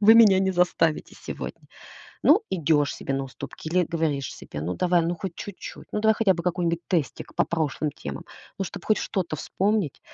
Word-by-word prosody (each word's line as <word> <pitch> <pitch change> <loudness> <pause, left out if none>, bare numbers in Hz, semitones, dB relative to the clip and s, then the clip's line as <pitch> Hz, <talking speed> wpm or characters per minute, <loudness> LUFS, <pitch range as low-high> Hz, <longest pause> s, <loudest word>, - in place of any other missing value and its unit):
вы 215 +2 +8
меня 215 -5 +8
не 190 0 +2
заставите 175 -3 +1
сегодня". - - -7 0.5
Ну, 360 +10 +6
идёшь 155 -4 +2
себе 135 - -3
на 135 0 -1
уступки 135 +3 -9
или 180 +2 +3
говоришь 155 -5 -1
себе: 75 - -8
"Ну, 85 +4 -2
давай, 180 -1 +3
ну, 170 +1 -1
хоть 185 0 -5
чуть-чуть. 200 +1 -8
Ну, - - 0
давай 220 0 +4
хотя 205 -3 +3
бы 170 -1 -5
какой-нибудь 170 -1 0
тестик 165 -8 -2
по - - +3
прошлым 155 -2 -1
темам. 70 - -7 0.3
Ну, 195 - 0
чтоб - - -7
хоть 215 - +3
что-то 180 -6 -2
вспомнить!" 190 +1 0
170 Hz, 190 wpm, -25 LUFS, 155-190 Hz, 0.5 s, вы